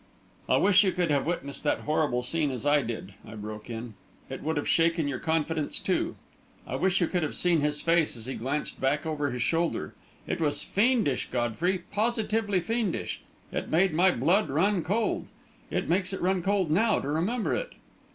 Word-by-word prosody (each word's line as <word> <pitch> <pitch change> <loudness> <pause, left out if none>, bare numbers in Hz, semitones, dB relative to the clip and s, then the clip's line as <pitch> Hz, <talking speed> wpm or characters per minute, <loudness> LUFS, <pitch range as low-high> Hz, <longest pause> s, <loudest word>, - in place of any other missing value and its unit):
"I - - +5
wish 200 0 +5
you 190 - +2
could 175 -3 0
have 140 0 +1
witnessed 140 -5 -3
that 150 - +1
horrible 150 -5 0
scene, 150 +3 0
as 130 0 -5
I 145 0 +4
did," 115 -5 -5
I 110 - -10
broke 105 +1 -7
in; 115 0 -6 0.4
"it - - -5
would 160 0 -1
have 145 - -2
shaken 165 -2 +2
your 140 -3 -2
confidence, 160 -1 -1
too! - - -1 0.5
I - - -4
wish 190 0 +1
you - - +4
could 180 +1 0
have 155 - -2
seen 175 -3 +3
his 150 0 0
face 165 -5 +2
as 110 - -7
he 130 - -4
glanced 140 +6 -3
back 140 +4 +1
over 150 -2 -1
his 125 -2 -2
shoulder! 165 0 0 0.3
It - - -3
was 150 -2 0
fiendish, 210 - +1
Godfrey; 145 - 0
positively 215 -2 +1
fiendish! 225 +1 -2 0.3
It - - -3
made 175 +2 +3
my 180 +4 +5
blood 180 - +2
run 180 +7 +2
cold. 215 +6 0 0.4
It - - -1
makes 185 +2 +1
it - - -4
run 185 0 +2
cold 195 -3 +1
now, 220 +7 +3
to - - -5
remember 180 +11 0
it!" - - -3
165 Hz, 190 wpm, -28 LUFS, 145-190 Hz, 0.5 s, I